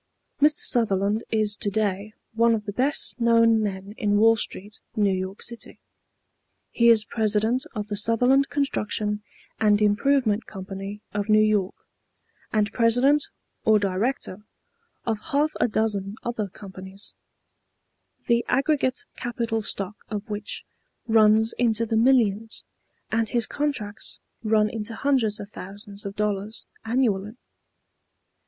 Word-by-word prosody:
Mr. 300 +1 +5
Sutherland 210 -2 +1
is 215 -2 +1
to 205 - -1
day 205 0 -2 0.2
one 230 0 +4
of 210 -1 -5
the 205 - -5
best 265 +3 +1
known 230 -1 +4
men 200 -1 -4
in 205 -1 +2
Wall 225 +2 +6
Street, 210 -1 -5
New 205 -2 +2
York 190 +1 -4
City. 235 -1 -6 0.9
He 235 0 +4
is 220 -2 +5
President 220 +3 0
of 210 -1 -3
the 210 - -3
Sutherland 245 +6 +3
Construction 210 -7 -1 0.4
and 210 -2 +4
Improvement 215 +1 +2
Company 195 +1 -7
of 205 0 -2
New 215 - +6
York, 210 -3 +1 0.8
and 210 -1 +1
president 250 +5 +3 0.4
or 220 -1 +5
director 205 +1 -2 0.6
of 225 -2 -1
half 305 0 +1
a - - +4
dozen 210 -3 -1
other 235 -3 -2
companies, 190 0 -8 1.1
the 235 0 +2
aggregate 270 0 +1
capital 235 -2 -2
stock 205 -1 -4
of 210 -1 -4
which 205 -1 -5 0.4
runs 220 0 +5
into 230 -2 +2
the 225 - -1
millions, 225 -3 +2 0.5
and 225 -1 +1
his 235 -2 +2
contracts 230 -9 -3 0.2
run 215 -1 +3
into 220 +1 -5
hundreds 240 -6 +1
of 205 0 -8
thousands 200 +2 -9
of 200 - -7
dollars 210 +1 -2 0.2
annually. 220 -3 0
215 Hz, 130 wpm, -25 LUFS, 205-235 Hz, 1.1 s, Wall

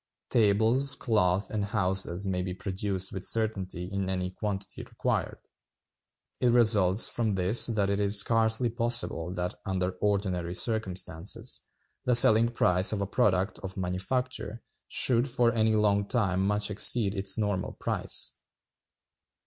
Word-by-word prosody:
Tables, 115 +6 +2
cloth, 100 -6 0
and 105 -2 -2
houses 95 -3 0
may 95 -2 -2
be 90 0 -5
produced 95 0 -2
with 95 -1 -6
certainty 100 -6 0
in 95 0 -4
any 90 -1 -3
quantity 100 0 -6
required. - - -3 1.0
It 125 - +1
results 110 -4 +4
from 110 -4 -2
this 95 +5 +3
that 105 -4 -1
it 100 - -1
is 100 0 +2
scarcely 115 +2 +1
possible 115 -7 0
that, 90 -1 -4
under 95 -2 -2
ordinary 95 -4 -2
circumstances, 95 0 -1 0.4
the 125 - +3
selling 115 -1 +6
price 90 -5 +3
of 105 - -2
a - - -1
product 95 0 0
of 95 0 -8
manufacture 110 +6 -4 0.2
should 125 +1 0
for 120 -1 +1
any 110 -1 +1
long 100 -1 +1
time 95 -5 0
much 105 0 -1
exceed 105 0 +3
its 95 -1 +2
normal 100 -4 -2
price. - - 0
100 Hz, 135 wpm, -27 LUFS, 95-110 Hz, 1.0 s, selling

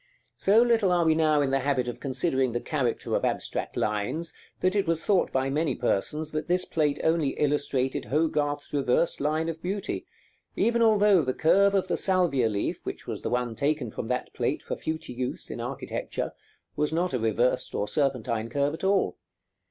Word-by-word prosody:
43, 195 - +2
79), - - +6
so 240 0 +5
little 210 -5 +2
are 175 -1 +3
we 160 - +5
now 155 -2 +3
in 135 - 0
the 135 - +2
habit 135 -2 0
of 120 - -5
considering 130 -2 0
the 120 - 0
character 130 -5 -2
of - - 0
abstract - - -2
lines, 105 +11 -1 0.3
that 185 +2 +1
it 200 -4 +1
was 165 -1 0
thought 195 -3 +2
by 130 0 0
many 150 +3 0
persons 150 +7 -1
that 155 0 -3
this 180 +1 +2
plate 150 -3 0
only 160 -4 +1
illustrated 140 -3 0
Hogarth's 145 -1 -1
reversed 140 +3 +1
line 155 +3 0
of 160 -1 -4
beauty, 195 +3 -3 0.5
even 235 0 +2
although 210 -4 +5
the 130 -3 -2
curve 200 +5 +4
of 190 -1 +1
the - - 0
salvia 175 - +2
leaf, 100 -1 -2
which - - -6
was - - -5
the - - -3
one 125 -1 -1
taken 140 -2 -1
from 110 - -5
that 125 +1 -2
plate - - -1
for - - -3
future 160 -5 -4
use, 125 +1 -4
in - - -5
architecture, - - -4 0.4
was 150 0 0
not 175 +1 0
a 125 - 0
reversed 115 +3 0
or 105 - -1
serpentine 115 -3 0
curve 140 +3 0
at 160 - -7
all. 190 - +2
150 Hz, 195 wpm, -27 LUFS, 130-170 Hz, 0.5 s, 79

